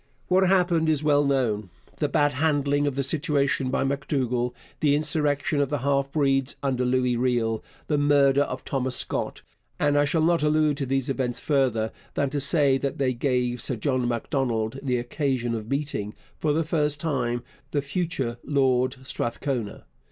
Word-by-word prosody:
What 190 +1 +4
happened 175 -4 +3
is 155 -1 +1
well 145 -1 +4
known 120 -8 0 0.3
the 150 - 0
bad 145 -1 +2
handling 145 0 +1
of 140 - -1
the 140 - 0
situation 140 -2 0
by 135 - 0
M'Dougall, 130 -3 -1 0.3
the 145 -2 +3
insurrection 150 -1 0
of 140 - 0
the 145 - 0
half 140 +1 0
breeds 135 -3 +2
under 130 -2 0
Louis 125 0 +1
Riel, 120 -3 0 0.2
the 150 -2 0
murder 140 -1 +4
of 130 -2 -3
Thomas 130 -2 -1
Scott - - -2 0.4
and 145 0 +3
I 145 - +4
shall 155 +2 +1
not 170 0 +3
allude 150 -1 +2
to 140 -2 -2
these 135 0 0
events 130 -3 -1
further 125 -7 +1 0.2
than 140 -2 0
to 145 -1 -1
say 140 -1 +3
that 140 - -3
they 130 -2 +1
gave 125 -1 0
Sir 130 - 0
John 130 +1 0
Macdonald 120 -1 -1
the 125 -3 0
occasion 120 -1 -1
of 110 -1 -5
meeting, 140 -7 -2 0.2
for 155 - +1
the 160 +3 +1
first 150 -2 0
time, 120 -6 -1 0.3
the 145 -2 -1
future 140 -6 -2
Lord 130 -2 +1
Strathcona. 125 -2 -3
140 Hz, 170 wpm, -25 LUFS, 125-145 Hz, 0.4 s, What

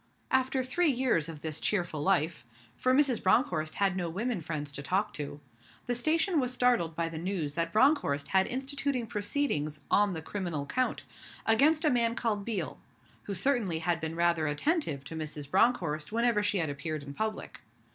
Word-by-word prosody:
After 260 0 +2
three 320 +6 +1
years 245 - +1
of 155 -3 -8
this 160 -1 -2
cheerful 175 -7 0
life 160 -5 +1 0.3
for 255 - +1
Mrs. 260 -3 +3
Bronckhorst 175 - +2
had 195 -2 +1
no 175 -2 -2
women 210 +3 -2
friends 150 -2 -4
to 140 - -5
talk 195 +8 0
to 145 -1 -6 0.5
the 245 - 0
station 315 +7 +2
was 250 -2 0
startled 245 -10 +2
by 170 0 0
the 165 -1 -6
news 170 -5 -2
that 165 +1 -1
Bronckhorst 215 - +2
had 190 0 +3
instituted 270 -2 -2
proceedings 205 - -1
on 205 -1 +4
the 160 - -4
criminal 170 -7 -3
count, 255 - -1 0.4
against 300 +8 +4
a 305 - +4
man 235 -1 +2
called 215 -4 -1
Biel, 195 - -3 0.5
who 200 - -3
certainly 205 -5 +1
had 165 +1 -1
been 160 0 -3
rather 170 -2 +2
attentive 150 - 0
to 150 +3 -8
Mrs. 150 -2 -6
Bronckhorst 170 -8 +2
whenever 230 -1 +2
she 205 -1 +1
had 160 -5 0
appeared 150 +1 -4
in 140 0 -8
public. 215 +5 -4
190 Hz, 175 wpm, -30 LUFS, 160-245 Hz, 0.5 s, on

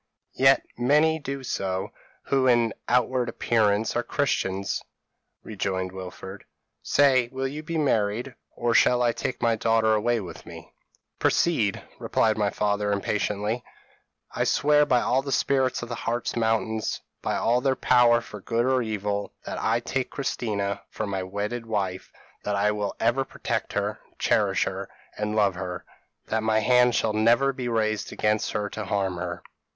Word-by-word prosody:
p> - - -8
"'Yet 135 0 +6 0.2
many 150 +5 +3
do 140 -2 -5
so, 95 -6 -2 0.3
who 135 -1 +1
in 120 -2 +3 0.2
outward 125 0 +2
appearance 110 -1 +1
are 120 - +2
Christians,' 100 -7 -1 0.6
rejoined 95 -3 -3
Wilfred; 95 +1 -8 0.4
'say, 130 - +3
will 135 0 -2
you 145 +3 -6
be 165 +1 -4
married, 120 -3 0 0.2
or 120 -1 0
shall 125 +1 +4
I 120 - +3
take 120 +2 -4
my 115 -1 +3
daughter 110 0 +2
away 115 +2 +1
with 95 -4 -8
me?' - - -12 0.5
"'Proceed,' 115 -13 +1 0.2
replied 110 -1 +1
my 105 -1 +1
father, 105 0 0
impatiently. 105 +3 -1 0.7
"'I - - -1
swear 150 0 +3
by 125 -3 +3
all 130 +2 +2
the 140 0 -5
spirits 130 -2 +1
of 120 - -7
the - - -3
Hartz 120 +1 -2
mountains, 110 -1 0 0.2
by - - -1
all 120 +2 +2
their 135 0 +2
power 120 -2 +4
for 105 -4 -10
good 115 +4 0
or 130 0 +3
for - - +2
evil, 105 -2 -3
that - - -4
I 115 +2 +1
take 130 +2 -2
Christina 100 -7 -2
for 110 - -4
my 100 -2 -2
wedded 105 +5 -4
wife; 95 -4 -3 0.3
that 105 - -1
I 100 +1 +2
will 105 -1 -3
ever 120 +4 +2
protect - - -4
her, - - -2 0.2
cherish - - +2
her, - - -4 0.3
and 105 0 -2
love 100 -3 +3
her; 90 -1 -6 0.4
that 110 0 -1
my 110 0 +2
hand 125 +2 +4
shall 110 - +1
never 120 +5 +3
be 125 -2 -4
raised 110 -2 -1
against 105 0 0
her 105 0 -1
to 110 - -5
harm 95 -2 -1
her.' 85 0 -5
115 Hz, 165 wpm, -26 LUFS, 105-125 Hz, 0.7 s, Yet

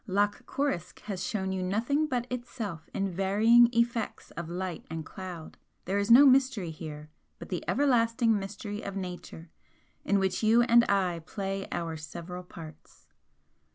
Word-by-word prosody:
Loch 205 +1 0
Coruisk 265 - -2
has 190 -3 -5
shown 190 -5 -2
you 190 -1 -2
nothing 235 +11 0
but 245 -4 -1
itself 235 -8 -5
in 195 0 -1
varying 215 +6 +5
effects 235 -1 -1
of 170 -1 -6
light 180 -1 -4
and 160 0 -5
cloud 180 -4 -8 0.3
there 195 +3 0
is 200 +2 -1
no 250 +5 +9
mystery 260 -9 +3
here 155 -1 -8 0.3
but - - -10
the - - -3
everlasting 230 -5 +2
mystery 205 +2 -6
of 200 - -6
Nature 180 -3 -7 0.5
in 200 - +2
which 190 -1 0
you 225 +2 +5
and 235 0 +6
I 185 -4 +1
play 195 -1 -4
our 165 -2 -3
several 170 +3 -7
parts. 160 -4 -13
195 Hz, 155 wpm, -29 LUFS, 180-230 Hz, 0.5 s, no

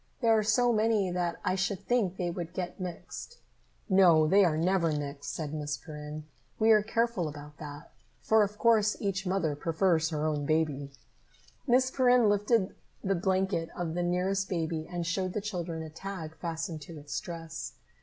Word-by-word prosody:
"There 230 -3 +4
are 215 - +3
so 235 +3 +3
many 215 -3 +2
that 175 -1 -1
I - - +2
should 190 +1 -1
think 210 -7 +1
they 175 -1 -1
would 170 0 -6
get 180 0 -4
mixed." 185 - -7 0.5
"No, 180 -5 +6
they 195 +6 +5
are 160 -4 +2
never 170 0 +2
mixed," 145 -1 -4
said 155 -2 -4
Miss 150 -2 -3
Perrin. 150 +1 -8 0.3
"We 220 0 +4
are 215 -1 +7
careful 225 -4 0
about 150 0 -9
that, 150 +1 -9 0.3
for 220 0 +4
of 210 0 0
course 215 -2 +3
each 195 -1 -2
mother 175 -6 0
prefers 165 +1 +1
her 155 -2 -2
own 150 -2 -1
baby." 150 -3 0 0.8
Miss 255 +1 +4
Perrin 250 -4 +4
lifted 205 0 +2 0.3
the 195 - +1
blanket 190 -2 0
of 170 -2 -2
the 175 - -1
nearest 185 +2 0
baby 160 -3 -2
and 175 -1 -2
showed 185 +2 -1
the - - -1
children 175 -6 -4
a 160 - -7
tag 165 -2 -7
fastened 165 -1 -4
to 160 +3 -9
its 145 -4 -4
dress. 165 -2 -7
175 Hz, 175 wpm, -30 LUFS, 160-200 Hz, 0.8 s, are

